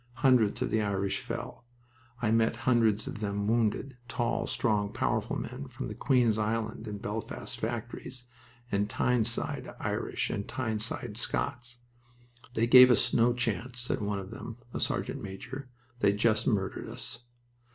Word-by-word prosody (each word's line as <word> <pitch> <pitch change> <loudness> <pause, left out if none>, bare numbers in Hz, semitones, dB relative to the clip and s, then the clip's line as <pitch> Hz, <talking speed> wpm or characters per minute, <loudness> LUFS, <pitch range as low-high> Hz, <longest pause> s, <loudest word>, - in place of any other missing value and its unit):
Hundreds 125 -6 +4
of - - -2
the 110 - +2
Irish 100 -1 0
fell. - - -6 0.6
I 110 - +3
met 115 0 +3
hundreds 115 -4 +3
of - - -6
them 100 -1 -1
wounded 115 +3 +1
tall, 120 0 -1
strong, 105 -3 +1
powerful - - 0
men, - - -6
from - - -5
Queen's 120 -5 +3
Island 110 +1 -1
and 105 -1 -5
Belfast 105 +1 -5
factories, 120 +2 -4 0.5
and 100 +1 +1
Tyneside 120 -1 0
Irish - - -1
and 100 - -3
Tyneside 120 -1 -2
Scots. 125 0 -2 0.8
"They 115 - +3
gave 125 +1 +10
us 120 - +3
no 120 +1 +5
chance," 120 +1 -2
said 120 - -1
one 105 -1 -1
of 95 +1 -6
them 115 0 -7 0.2
a - - -2
sergeant - - -1
major. 125 +8 -7 0.3
"They 100 - +4
just 110 +1 +2
murdered 100 -5 0
us." 115 - -8
115 Hz, 145 wpm, -30 LUFS, 105-120 Hz, 0.8 s, gave